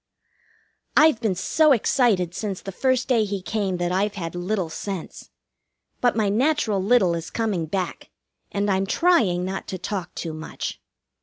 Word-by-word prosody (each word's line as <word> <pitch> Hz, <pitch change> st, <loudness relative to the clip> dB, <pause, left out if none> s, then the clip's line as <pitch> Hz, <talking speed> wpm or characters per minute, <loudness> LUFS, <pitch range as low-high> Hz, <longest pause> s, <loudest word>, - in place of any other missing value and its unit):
I've 310 Hz, -7 st, +5 dB
been 210 Hz, -5 st, +1 dB
so 300 Hz, -, +4 dB
excited 215 Hz, -7 st, +2 dB
since 195 Hz, -1 st, -3 dB
the 195 Hz, -, -7 dB
first 260 Hz, +5 st, +1 dB
day 240 Hz, -5 st, +3 dB
he 200 Hz, -1 st, -3 dB
came 195 Hz, -1 st, -2 dB
that 175 Hz, 0 st, -1 dB
I've 200 Hz, +3 st, 0 dB
had 165 Hz, -4 st, -5 dB
little 180 Hz, -1 st, -2 dB
sense. 195 Hz, 0 st, -6 dB, 0.7 s
But 245 Hz, -1 st, +2 dB
my 215 Hz, -2 st, +2 dB
natural 225 Hz, -2 st, +1 dB
little 200 Hz, -5 st, +4 dB
is 165 Hz, -1 st, -4 dB
coming 205 Hz, -8 st, -1 dB
back, 185 Hz, +2 st, -3 dB, 0.4 s
and 200 Hz, 0 st, -1 dB
I'm 190 Hz, 0 st, +1 dB
trying 210 Hz, -, +3 dB
not 190 Hz, +1 st, -4 dB
to 185 Hz, -, -4 dB
talk 185 Hz, -1 st, -5 dB
too 165 Hz, -2 st, -4 dB
much. 155 Hz, +1 st, -6 dB
200 Hz, 160 wpm, -24 LUFS, 180-230 Hz, 0.7 s, I've